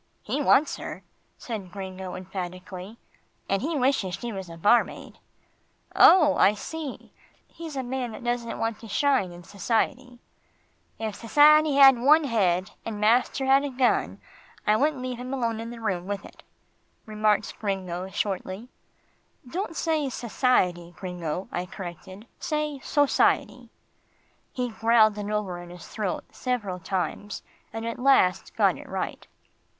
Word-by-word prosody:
"He 295 - -2
wants 290 +1 +3
her," - - -7 0.3
said 205 -7 -6
Gringo 190 -1 -6
emphatically, 185 +2 -7 0.5
"and 195 0 0
he 310 +4 -1
wishes 255 -9 +1
she 240 -1 -5
was 190 -3 -6
a 165 - -9
barmaid." 210 +8 +1 0.8
"Oh! 310 -6 +7
I 205 - +5
see 305 +4 -7 0.3
he's 325 -3 -9
a 265 - -2
man 245 -2 -3
that - - -9
doesn't 240 -1 -2
want 225 -1 -2
to 225 - -11
shine 260 -4 +1
in 175 0 -11
society." 240 +6 -2 0.8
"If 215 -2 -4
sassiety 300 +5 +5
had 270 -3 +8
one 300 +6 +5
head, 190 -8 +1
and 220 -2 -5
master 245 +5 +2
had 270 +1 +5
a 285 - -2
gun, 255 -1 +1 0.5
I 210 - +4
wouldn't 275 +2 +1
leave 250 -1 -4
him 255 +2 -4
alone 230 -3 -1
in 230 +1 -5
the 235 0 -8
room 190 -5 -2
with 200 0 -4
it," - - -14 0.6
remarked 215 -1 0
Gringo 190 -3 -3
shortly. 195 +3 -3 0.8
"Don't 330 +4 -4
say 315 -4 0
'sassiety,' 185 -9 0
Gringo," 180 -1 -4
I 180 +1 -3
corrected. 185 +3 -9
"Say 300 -3 -2
'society.'" 290 +1 +1 0.8
He 250 -1 -2
growled 220 -2 +3
it 205 0 -4
over 200 -4 -2
in 175 - -11
his 175 0 -11
throat 205 -5 -3
several 210 -8 -3
times, 195 +3 -3 0.3
and 225 +1 -5
at 230 +1 -4
last 250 -9 +3
got - - +3
it - - -12
right. - - -4
225 Hz, 145 wpm, -26 LUFS, 190-265 Hz, 0.8 s, had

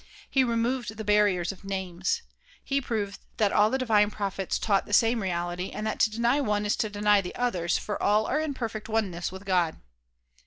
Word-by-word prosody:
He 265 - +4
removed 235 -1 -1
the 220 - -4
barriers 205 -4 +2
of 195 - -14
"Names." 190 - -2 0.4
He 275 0 0
proved 210 -5 -3 0.2
that 210 -2 +2
all 210 +1 +5
the 265 - 0
divine 215 -5 +3
prophets 195 -2 -2
taught 200 -3 +1
the 205 - -6
same 230 +2 +4
reality 175 0 -2
and 215 - -5
that 220 - -2
to - - +4
deny 235 +6 +1
one 210 -5 0
is 210 - +1
to 215 - 0
deny 205 0 +3
the 180 - -7
others, 185 -9 0
for 210 - -4
all 210 +1 +3
are 295 - 0
in 310 -3 -2
perfect 225 -3 -5
oneness 190 -7 -1
with 190 +1 -10
God. 180 -4 +1
210 Hz, 200 wpm, -27 LUFS, 190-230 Hz, 0.4 s, all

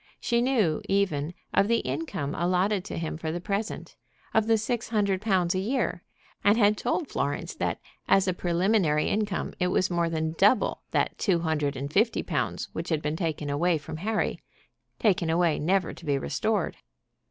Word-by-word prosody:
She 235 -1 +1
knew, 225 - +2
even, 175 -5 0 0.2
of 200 - +4
the 230 +1 +3
income 145 +1 -3
allotted 180 +3 +1
to - - -5
him 160 -1 -3
for 160 -1 -3
the 175 - -3
present, 200 +4 -3 0.4
of 220 0 +3
the 225 -1 +4
six 230 +2 -2
hundred 200 -4 +1
pounds 185 -5 +2
a 185 - 0
year, 195 -5 -1 0.4
and 205 +2 +5
had 210 -2 +4
told 245 - -1
Florence 145 - -2
that - - -2 0.3
as 195 0 +4
a 185 - +2
preliminary 175 -3 +1
income 210 -1 -1
it 180 - +2
was 185 +1 +1
more 170 -1 +1
than 160 -1 -1
double 205 +6 +3
that - - 0
two 180 -6 +2
hundred 150 -3 0
and 140 +3 -5
fifty 220 +3 +2
pounds - - -2
which - - -4
had 155 -2 0
been 150 +1 -1
taken 160 -3 -2
away 160 +4 +2
from 150 +1 -7
Harry, 215 +6 -1 0.6
taken 180 -6 +2
away 165 -1 +2
never 185 +3 +1
to - - -14
be 145 -3 +1
restored. 70 - -1
180 Hz, 180 wpm, -27 LUFS, 160-210 Hz, 0.6 s, and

